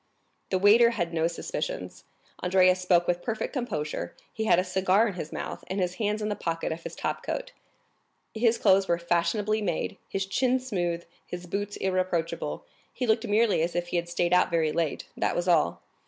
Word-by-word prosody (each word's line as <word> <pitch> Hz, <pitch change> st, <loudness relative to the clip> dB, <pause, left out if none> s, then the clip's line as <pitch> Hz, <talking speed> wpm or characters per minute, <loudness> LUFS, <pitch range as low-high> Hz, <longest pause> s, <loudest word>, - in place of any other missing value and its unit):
The 190 Hz, -, +2 dB
waiter 215 Hz, +5 st, +6 dB
had 175 Hz, -8 st, -2 dB
no 165 Hz, 0 st, +2 dB
suspicions; -, -, -5 dB, 0.4 s
Andrea 185 Hz, 0 st, +5 dB
spoke 180 Hz, -1 st, +2 dB
with 175 Hz, 0 st, 0 dB
perfect 225 Hz, -2 st, -3 dB
composure, 155 Hz, -, -3 dB, 0.2 s
he 220 Hz, -, -2 dB
had 175 Hz, -, +5 dB
a 180 Hz, -, +3 dB
cigar 190 Hz, +4 st, +2 dB
in 205 Hz, -, -3 dB
his 165 Hz, -4 st, -6 dB
mouth, -, -, -5 dB
and 190 Hz, +2 st, -2 dB
his 180 Hz, -1 st, -1 dB
hands 210 Hz, 0 st, 0 dB
in -, -, 0 dB
the 205 Hz, -, -1 dB
pocket 165 Hz, -3 st, -2 dB
of 160 Hz, +1 st, -4 dB
his -, -, -7 dB
top -, -, -3 dB
coat; -, -, -4 dB, 0.8 s
his 230 Hz, +1 st, +2 dB
clothes 195 Hz, -1 st, +4 dB
were 170 Hz, -, +2 dB
fashionably 175 Hz, +5 st, 0 dB
made, 175 Hz, -6 st, -2 dB
his 195 Hz, 0 st, -1 dB
chin 250 Hz, +7 st, +1 dB
smooth, 175 Hz, -9 st, -2 dB, 0.2 s
his 180 Hz, 0 st, -6 dB
boots 205 Hz, +3 st, -3 dB
irreproachable; 170 Hz, -, -1 dB, 0.3 s
he 250 Hz, -, -3 dB
looked 220 Hz, -1 st, +2 dB
merely 210 Hz, -3 st, +3 dB
as 170 Hz, +1 st, -1 dB
if 175 Hz, 0 st, -1 dB
he 175 Hz, -, 0 dB
had 170 Hz, 0 st, -2 dB
stayed 175 Hz, 0 st, +1 dB
out 180 Hz, -, +4 dB
very 165 Hz, -3 st, +1 dB
late, 165 Hz, -3 st, -2 dB
that -, -, 0 dB
was 175 Hz, +1 st, -1 dB
all. 160 Hz, -, +2 dB
185 Hz, 195 wpm, -27 LUFS, 170-215 Hz, 0.8 s, waiter